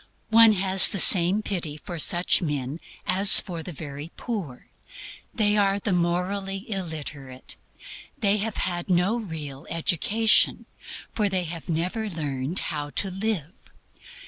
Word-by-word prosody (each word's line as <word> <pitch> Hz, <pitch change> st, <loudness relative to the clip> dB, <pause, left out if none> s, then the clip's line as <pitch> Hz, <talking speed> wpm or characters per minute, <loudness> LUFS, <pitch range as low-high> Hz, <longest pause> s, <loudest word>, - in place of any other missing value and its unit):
One 225 Hz, -1 st, +6 dB
has 190 Hz, -1 st, +6 dB
the 200 Hz, -, -4 dB
same 190 Hz, +3 st, +6 dB
pity 165 Hz, -8 st, -4 dB
for 170 Hz, +2 st, -9 dB
such 175 Hz, +3 st, +3 dB
men 145 Hz, -2 st, -4 dB, 0.3 s
as 195 Hz, +2 st, +6 dB
for 175 Hz, -5 st, -5 dB
the 180 Hz, -, -8 dB
very 145 Hz, 0 st, -9 dB
poor. 190 Hz, -, -7 dB, 0.7 s
They 210 Hz, -3 st, +1 dB
are 200 Hz, -1 st, +1 dB
the 200 Hz, -1 st, -2 dB
morally 190 Hz, +3 st, -3 dB
illiterate. 155 Hz, -, -8 dB, 0.6 s
They 205 Hz, -1 st, +1 dB
have 215 Hz, +1 st, -4 dB
had 175 Hz, 0 st, -4 dB
no 185 Hz, +6 st, +1 dB
real 155 Hz, -9 st, -9 dB
education, 205 Hz, +6 st, +2 dB, 0.5 s
for 210 Hz, -2 st, -1 dB
they 185 Hz, -2 st, -1 dB
have 170 Hz, 0 st, -9 dB
never 180 Hz, +7 st, -3 dB
learned 145 Hz, -2 st, -5 dB, 0.2 s
HOW 145 Hz, -1 st, -5 dB
TO 190 Hz, +6 st, -3 dB
LIVE. 190 Hz, -4 st, -4 dB
180 Hz, 135 wpm, -24 LUFS, 155-200 Hz, 0.7 s, One